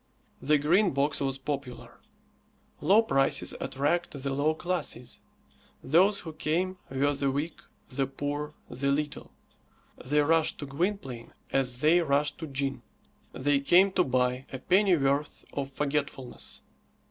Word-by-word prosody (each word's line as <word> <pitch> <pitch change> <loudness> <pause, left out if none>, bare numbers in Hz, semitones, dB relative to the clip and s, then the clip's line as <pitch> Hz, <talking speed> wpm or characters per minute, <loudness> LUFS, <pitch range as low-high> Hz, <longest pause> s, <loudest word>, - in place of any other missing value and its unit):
The 150 +3 +3
Green 170 +4 +3
Box 140 +1 +1
was 135 -1 -1
popular. 135 -2 -6 0.8
Low 210 +4 +5
prices 135 -9 +1
attract 145 +6 -1
the 140 -1 -1
low 150 +3 +1
classes. 175 -8 -3 0.6
Those 190 +8 +4
who 160 -2 -8
came 175 +5 -1
were 140 +2 +1
the 140 0 0
weak, 145 +4 -3 0.3
the 135 0 -1
poor, 145 +2 -4
the 130 +3 -3
little. 150 +1 -3 0.7
They 150 +3 +2
rushed 160 +1 +2
to 145 - -6
Gwynplaine 140 - -3 0.2
as 125 -2 0
they 160 +3 +5
rushed 145 -1 +1
to 160 - -5
gin. 135 -2 -2 0.5
They 140 +2 +2
came 180 +7 +5
to 185 - +3
buy 125 -1 0
a 130 - -4
pennyworth 150 -4 +2
of 140 -1 -3
forgetfulness. 140 -3 -3
145 Hz, 135 wpm, -28 LUFS, 135-165 Hz, 0.8 s, Low